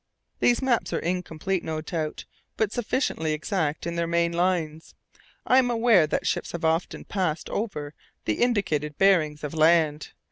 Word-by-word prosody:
These 245 Hz, +2 st, +3 dB
maps 250 Hz, -3 st, +1 dB
are -, -, +1 dB
incomplete, 180 Hz, +1 st, -2 dB
no 160 Hz, -1 st, -3 dB
doubt, 155 Hz, -1 st, -4 dB, 0.3 s
but 220 Hz, -2 st, +1 dB
sufficiently 215 Hz, -, -1 dB
exact 155 Hz, -1 st, -2 dB
in 170 Hz, 0 st, -3 dB
their 170 Hz, 0 st, 0 dB
main 170 Hz, 0 st, +1 dB
lines. 170 Hz, -3 st, -1 dB, 0.5 s
I 255 Hz, -, +5 dB
am 250 Hz, -2 st, +2 dB
aware 225 Hz, -8 st, +4 dB
that -, -, -2 dB
ships -, -, -2 dB
have 170 Hz, -1 st, -3 dB
often 165 Hz, +2 st, -1 dB
passed 180 Hz, -6 st, -2 dB
over 150 Hz, -9 st, -3 dB, 0.3 s
the 105 Hz, -, -1 dB
indicated 180 Hz, -11 st, 0 dB
bearings 155 Hz, -6 st, +3 dB
of 150 Hz, -, -4 dB
land. 155 Hz, -1 st, +2 dB
170 Hz, 155 wpm, -25 LUFS, 155-195 Hz, 0.5 s, I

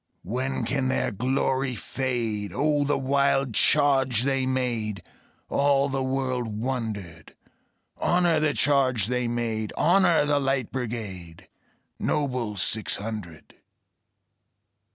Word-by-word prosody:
When 125 Hz, +5 st, -2 dB
can 130 Hz, +2 st, 0 dB
their 130 Hz, -, 0 dB
glory 130 Hz, +3 st, 0 dB
fade? 115 Hz, -5 st, -3 dB
O 150 Hz, 0 st, +2 dB
the 145 Hz, +1 st, +1 dB
wild 135 Hz, -1 st, +1 dB
charge 135 Hz, -2 st, +3 dB
they 135 Hz, -1 st, 0 dB
made! 120 Hz, -6 st, -2 dB, 0.4 s
All 140 Hz, 0 st, +2 dB
the 135 Hz, 0 st, -1 dB
world 130 Hz, -2 st, -1 dB
wondered. 105 Hz, -7 st, -5 dB, 0.6 s
Honor 175 Hz, -2 st, +2 dB
the 155 Hz, -1 st, +1 dB
charge 130 Hz, -7 st, +2 dB
they 125 Hz, +1 st, -1 dB
made! 115 Hz, -2 st, -2 dB
Honor 175 Hz, -2 st, +4 dB
the 145 Hz, -1 st, +2 dB
Light 135 Hz, -3 st, -1 dB
Brigade, 105 Hz, -10 st, -6 dB, 0.5 s
Noble 125 Hz, -8 st, -1 dB
six 110 Hz, +3 st, 0 dB
hundred! 100 Hz, -7 st, -7 dB
130 Hz, 110 wpm, -26 LUFS, 110-140 Hz, 0.6 s, Honor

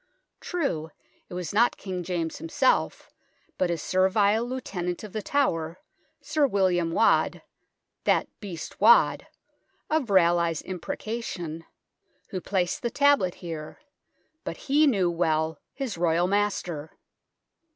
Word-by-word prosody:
True, 220 Hz, -, -2 dB, 0.4 s
it -, -, -7 dB
was 180 Hz, -2 st, -4 dB
not 235 Hz, +4 st, +3 dB
King 185 Hz, -2 st, -5 dB
James 170 Hz, -2 st, -3 dB
himself, 290 Hz, -5 st, 0 dB, 0.5 s
but 185 Hz, -, +2 dB
his 170 Hz, -3 st, -2 dB
servile 200 Hz, +4 st, +3 dB
Lieutenant 195 Hz, -9 st, -4 dB
of 210 Hz, -, -9 dB
The 215 Hz, -, -2 dB
Tower, 170 Hz, -, 0 dB, 0.4 s
Sir 295 Hz, -1 st, +2 dB
William 180 Hz, -6 st, +1 dB
Waad -, -, +2 dB, 0.6 s
"that -, -, +3 dB
beast 185 Hz, -5 st, -8 dB
Waad 230 Hz, +3 st, +5 dB, 0.3 s
" -, -, -44 dB
of 305 Hz, -7 st, +1 dB
Raleigh's 170 Hz, -4 st, +3 dB
imprecation 180 Hz, -3 st, -5 dB, 0.6 s
who 185 Hz, -, -4 dB
placed 180 Hz, -2 st, -1 dB
the 240 Hz, -, -1 dB
tablet 280 Hz, -9 st, +3 dB
here, 155 Hz, -2 st, -6 dB, 0.6 s
but -, -, -5 dB
he 295 Hz, +3 st, +3 dB
knew 190 Hz, -9 st, +2 dB
well 160 Hz, -2 st, 0 dB
his 255 Hz, -11 st, -5 dB
Royal 170 Hz, 0 st, +2 dB
master. 180 Hz, -6 st, -1 dB
185 Hz, 120 wpm, -26 LUFS, 170-230 Hz, 0.6 s, Waad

